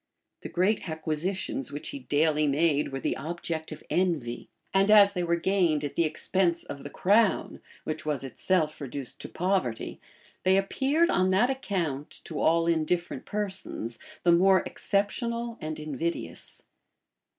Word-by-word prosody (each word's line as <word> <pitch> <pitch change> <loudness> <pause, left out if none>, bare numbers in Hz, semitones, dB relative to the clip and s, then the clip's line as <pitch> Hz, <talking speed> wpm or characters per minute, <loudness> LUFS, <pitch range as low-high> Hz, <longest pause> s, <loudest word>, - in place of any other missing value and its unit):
The - - -7
great 190 +1 +1
acquisitions 160 -1 -2
which 145 - -5
he 140 - -6
daily 150 +3 +2
made 150 0 +2
were 135 - -3
the - - -1
object 160 +1 -4
of - - -8
envy; 165 -10 -1 0.2
and 195 +1 +4
as 205 -1 +7
they 180 - -1
were 170 0 +2
gained 170 -4 +1
at 145 - -3
the 170 - +2
expense 170 +2 0
of 140 - -8
the 145 - -6
crown, 205 +6 +2 0.2
which 155 0 -4
was 150 -4 -2
itself 155 +4 0
reduced 135 -1 -6
to - - -7
poverty, 180 -11 -1 0.4
they 185 +1 +4
appeared 280 - +2
on 185 0 +3
that 205 +8 +3
account, 170 - -2
to - - -5
all 165 +1 +3
indifferent 170 -3 0
persons, 190 - -4 0.2
the 175 - +5
more 190 +2 +5
exceptionable 235 +3 -1
and 155 0 -4
invidious. 155 +2 -4
170 Hz, 150 wpm, -28 LUFS, 150-195 Hz, 0.4 s, as